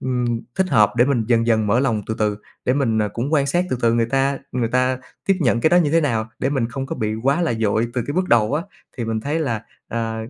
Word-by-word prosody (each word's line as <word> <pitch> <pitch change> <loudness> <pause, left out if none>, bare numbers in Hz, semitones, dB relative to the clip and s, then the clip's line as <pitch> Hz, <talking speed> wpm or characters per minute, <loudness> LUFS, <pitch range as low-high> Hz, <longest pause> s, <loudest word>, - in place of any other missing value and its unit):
ừm, 125 -2 -1
thích 190 -1 +1
hợp 105 - +4
để 120 - +5
mình 130 -5 +1
dần 115 -1 +3
dần 110 -2 +2
mở 115 +5 +3
lòng 115 -6 0
từ 110 - -2
từ 105 -1 0 0.3
để 125 - +2
mình, 115 -6 +1
ờ, 105 -1 +1
cũng 120 +9 -4
quan 140 -2 +3
sát 175 +6 +1
từ 130 - 0
từ 115 0 +3
người 115 -1 +2
ta 135 +2 0
người 120 -3 0
ta 130 +1 +1 0.3
tiếp 195 - +4
nhận 120 -4 +2
cái 160 - +3
đó 175 - +5
như 165 -5 +3
thế 165 - +4
nào 115 -7 -1
để 135 - 0
mình 130 -5 0
không 135 +2 -5
có - - -5
bị 110 0 -1
quá 135 +9 +1
là 165 - +1
vội 110 +2 +1
từ 125 - 0
cái 145 - -3
bước 185 +1 0
đầu 115 +3 +3
á. 160 - 0 0.3
Thì 120 - -3
mình 110 -1 -2
thấy 145 +6 -2
là, 115 -8 -2 0.3
ờ, 115 -1 -3
120 Hz, 280 wpm, -21 LUFS, 110-140 Hz, 0.3 s, để